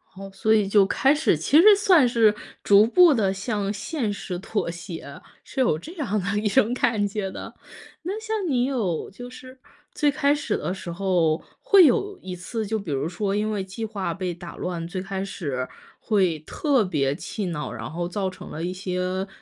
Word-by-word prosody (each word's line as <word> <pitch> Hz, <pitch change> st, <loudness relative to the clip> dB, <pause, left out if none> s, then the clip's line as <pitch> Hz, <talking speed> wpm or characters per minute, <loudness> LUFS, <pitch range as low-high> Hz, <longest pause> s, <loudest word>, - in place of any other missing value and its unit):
哦， 195 Hz, +1 st, -8 dB
所 220 Hz, +3 st, +2 dB
以 210 Hz, -2 st, +3 dB
就 200 Hz, 0 st, +5 dB
开 270 Hz, +7 st, +3 dB
始 300 Hz, -, +2 dB
其 270 Hz, -, +4 dB
实 415 Hz, +2 st, +8 dB
算 370 Hz, -, +5 dB
是 225 Hz, -3 st, +4 dB, 0.3 s
逐 205 Hz, +1 st, +6 dB
步 340 Hz, +5 st, +6 dB
地 200 Hz, -5 st, +1 dB
向 200 Hz, 0 st, -2 dB
现 220 Hz, +2 st, -3 dB
实 195 Hz, -3 st, -5 dB
妥 195 Hz, -2 st, -2 dB
协， 170 Hz, 0 st, -9 dB, 0.2 s
是 -, -, -7 dB
有 240 Hz, -12 st, +3 dB
这 315 Hz, -, -10 dB
样 245 Hz, -, -2 dB
的 200 Hz, +3 st, -1 dB
一 210 Hz, -, -1 dB
种 210 Hz, +3 st, +3 dB
感 230 Hz, -4 st, +1 dB
觉 200 Hz, -1 st, -3 dB
的。 -, -, -8 dB, 0.5 s
那 390 Hz, +6 st, -3 dB
像 440 Hz, 0 st, -3 dB
你 250 Hz, -2 st, +2 dB
有 220 Hz, -, -2 dB
就 245 Hz, +5 st, -9 dB
是 255 Hz, +1 st, -13 dB, 0.3 s
最 295 Hz, -, +2 dB
开 285 Hz, 0 st, +2 dB
始 295 Hz, -, -2 dB
的 -, -, -3 dB
时 185 Hz, -2 st, -7 dB
候 175 Hz, -3 st, +1 dB, 0.2 s
会 390 Hz, -4 st, +6 dB
有 390 Hz, +10 st, +1 dB
一 185 Hz, -1 st, -6 dB
次， 220 Hz, +5 st, -4 dB
就 220 Hz, +2 st, -2 dB
比 185 Hz, -7 st, -6 dB
如 140 Hz, +2 st, -1 dB
说 195 Hz, +3 st, -2 dB
因 215 Hz, +1 st, 0 dB
为 205 Hz, -3 st, -2 dB
计 195 Hz, +4 st, -6 dB
划 205 Hz, -3 st, -3 dB
被 185 Hz, -2 st, -3 dB
打 170 Hz, 0 st, -10 dB
乱， 170 Hz, -2 st, -4 dB
最 185 Hz, +2 st, -4 dB
开 195 Hz, 0 st, -4 dB
始 140 Hz, -10 st, -4 dB, 0.3 s
会 185 Hz, -7 st, +1 dB
特 265 Hz, -, +1 dB
别 145 Hz, -7 st, 0 dB
气 205 Hz, +7 st, -5 dB
恼， 160 Hz, -4 st, -4 dB
然 115 Hz, +2 st, -7 dB
后 175 Hz, +1 st, -3 dB
造 190 Hz, +2 st, -2 dB
成 185 Hz, 0 st, -11 dB
了 160 Hz, -, -6 dB
一 180 Hz, -, -2 dB
些， 185 Hz, +1 st, -3 dB
200 Hz, 215 characters per minute, -24 LUFS, 180-245 Hz, 0.5 s, 实